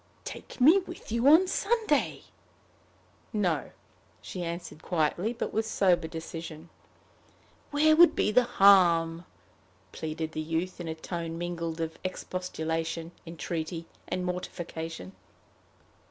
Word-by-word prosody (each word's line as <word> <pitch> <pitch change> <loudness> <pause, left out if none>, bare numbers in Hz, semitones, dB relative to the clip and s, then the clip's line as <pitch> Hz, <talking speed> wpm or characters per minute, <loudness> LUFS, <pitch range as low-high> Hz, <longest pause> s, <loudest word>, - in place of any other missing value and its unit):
"Take - - -9
me 315 +10 +7
with 355 - -10
you 235 +3 +2
on 320 +6 +8
Sunday?" 410 -7 0 1.1
"No," 185 -8 0 0.5
she 180 - -7
answered 170 -2 -6
quietly, 175 +6 0
but 240 - -4
with 220 +1 0
sober 180 -6 +2
decision. 165 0 -7 1.0
"Where 310 +2 +4
would 345 +2 +7
be - - +2
the 250 +2 +4
harm?" 175 -6 +5 0.7
pleaded 160 0 -4
the 155 - -3
youth, 165 +4 -3
in 170 - -6
a 160 - -3
tone 165 0 -5
mingled 170 -1 -4
of 160 0 -4
expostulation, 165 -3 -3 0.2
entreaty, 165 0 -4 0.2
and 180 - -2
mortification. 165 - -5
175 Hz, 115 wpm, -29 LUFS, 165-215 Hz, 1.1 s, on